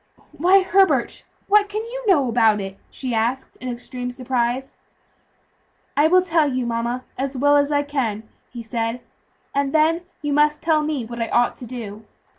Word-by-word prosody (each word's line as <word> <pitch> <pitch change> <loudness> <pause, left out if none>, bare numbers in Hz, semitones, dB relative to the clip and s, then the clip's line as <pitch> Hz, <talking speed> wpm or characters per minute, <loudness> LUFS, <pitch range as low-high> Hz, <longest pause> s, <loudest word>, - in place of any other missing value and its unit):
"Why, 375 +4 +4
Herbert, 385 +1 +2 0.2
what 410 0 +4
can 425 +2 -3
you - - -7
know 300 -10 +4
about 225 -3 +3
it?" 195 0 -7
she 255 -3 -5
asked 235 +4 -1
in 255 - -6
extreme 245 +1 -5
surprise. 250 0 -2 1.2
"I 295 +2 +5
will 365 +2 +5
tell 325 -5 +2
you, 255 -1 -1
mama, 235 +2 -2 0.2
as 270 0 -2
well 285 +2 +4
as 285 0 +3
I 290 0 +2
can," 250 -7 -2 0.3
he 240 -2 -8
said, 230 +1 -3 0.5
"and 280 0 0
then 320 +2 +3 0.2
you 295 -1 0
must 300 +1 +3
tell 315 -1 +2
me 300 -5 -2
what 235 +1 -6
I 230 - 0
ought 240 0 +2
to 245 - -9
do. 220 -3 -7
265 Hz, 175 wpm, -22 LUFS, 240-305 Hz, 1.2 s, I